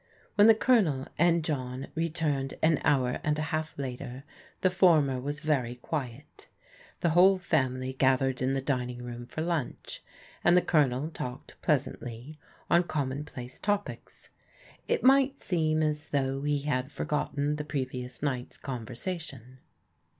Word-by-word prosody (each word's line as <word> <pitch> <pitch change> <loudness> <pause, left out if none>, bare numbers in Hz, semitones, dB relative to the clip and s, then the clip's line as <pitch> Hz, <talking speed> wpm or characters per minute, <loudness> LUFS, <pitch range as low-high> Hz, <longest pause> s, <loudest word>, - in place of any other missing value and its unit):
When 205 +1 +6
the 225 - +8
Colonel 195 - +3
and 170 -1 +4
John 130 -3 -3
returned 155 -4 -1
an 160 -1 +4
hour 130 -4 +2
and 150 0 +1
a - - -1
half 155 0 -2
later 130 -1 -5 0.4
the 185 - +3
former 155 -8 +4
was 145 +3 -4
very 135 -6 0
quiet. 130 0 -6 0.5
The 170 - +2
whole 185 +3 +6
family 130 -6 0
gathered 130 0 +2
in 130 +1 +1
the 135 -1 -1
dining 125 -3 -2
room 120 0 -7
for 155 - -5
lunch, 165 -5 -3 0.4
and 175 +1 +6
the 180 - +4
Colonel 145 -2 +2
^ - - -19
talked 125 0 -7
pleasantly 125 +6 -2 0.3
on 170 - +5
commonplace 135 -4 -4
topics. 205 0 -3 0.6
It - - 0
might 275 +1 +5
seem 155 -3 +1
as 150 0 -2
though 135 -1 0
he 145 0 0
had 135 -2 -1
forgotten 145 0 -1
the 150 - -3
previous 130 -3 -4
night's 130 -4 -2
conver 125 -2 -6
sation. 135 -8 -6
145 Hz, 145 wpm, -29 LUFS, 130-160 Hz, 0.6 s, the